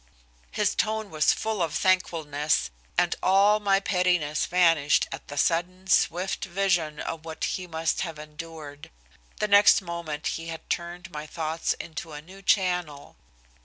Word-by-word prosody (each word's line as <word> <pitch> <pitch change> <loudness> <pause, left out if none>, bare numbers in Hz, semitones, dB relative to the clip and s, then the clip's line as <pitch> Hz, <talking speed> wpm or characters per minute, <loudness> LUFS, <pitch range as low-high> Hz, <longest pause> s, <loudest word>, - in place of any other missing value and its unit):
His - - 0
tone 220 -2 -1
was 155 -1 +3
full 220 -3 -2
of 160 -2 -1
thankfulness, 155 - +1 0.3
and 175 0 +2
all 200 +3 +4
my 200 -2 +3
pettiness 180 -6 +1
vanished 165 -5 +3
at - - -7
the 145 - -8
sudden, 180 +5 0
swift 185 0 +1
vision 175 -5 0
of 165 -1 -5
what 160 -1 -7
he 185 -1 -2
must 160 -1 -1
have 165 -4 -4
endured. 150 -1 -9 0.5
The 210 - +1
next 200 0 +7
moment 170 -4 -6
he 165 0 -3
had 165 -1 -7
turned 175 +1 -4
my 150 -1 -6
thoughts 160 +1 -2
into 160 0 -8
a 150 - -6
new 190 +4 -14
channel. 180 -7 0
170 Hz, 150 wpm, -26 LUFS, 155-185 Hz, 0.5 s, next